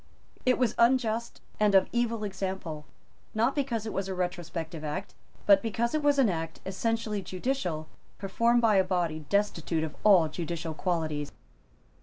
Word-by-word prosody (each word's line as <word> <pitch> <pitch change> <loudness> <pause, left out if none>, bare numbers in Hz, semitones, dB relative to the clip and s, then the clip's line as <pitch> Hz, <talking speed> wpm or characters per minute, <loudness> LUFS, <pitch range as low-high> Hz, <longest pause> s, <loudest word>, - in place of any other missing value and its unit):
It 255 - +5
was 245 -3 +2
unjust 235 -1 +2 0.2
and 210 -2 +4
of 190 - +6
evil 230 -2 0
example, 190 -6 -4 0.5
not 230 +5 +2
because 245 -7 -1
it 220 - -4
was 195 0 -2
a 190 - -3
retrospective 170 -3 -4
Act, 170 +6 -4 0.3
but 200 -1 +6
because 230 +2 -1
it 310 - +1
was 290 -1 +3
an 270 -4 +5
act 165 -3 -3
essentially 215 +2 -1
judicial, 180 - -3 0.3
performed 230 +5 +2
by 215 -3 +5
a 190 - +5
body 170 -5 -2
destitute 175 -5 0
of 155 - -4
all 190 -6 +6
judicial 165 +1 -4
qualities. 155 -4 -2
195 Hz, 155 wpm, -29 LUFS, 170-230 Hz, 0.5 s, of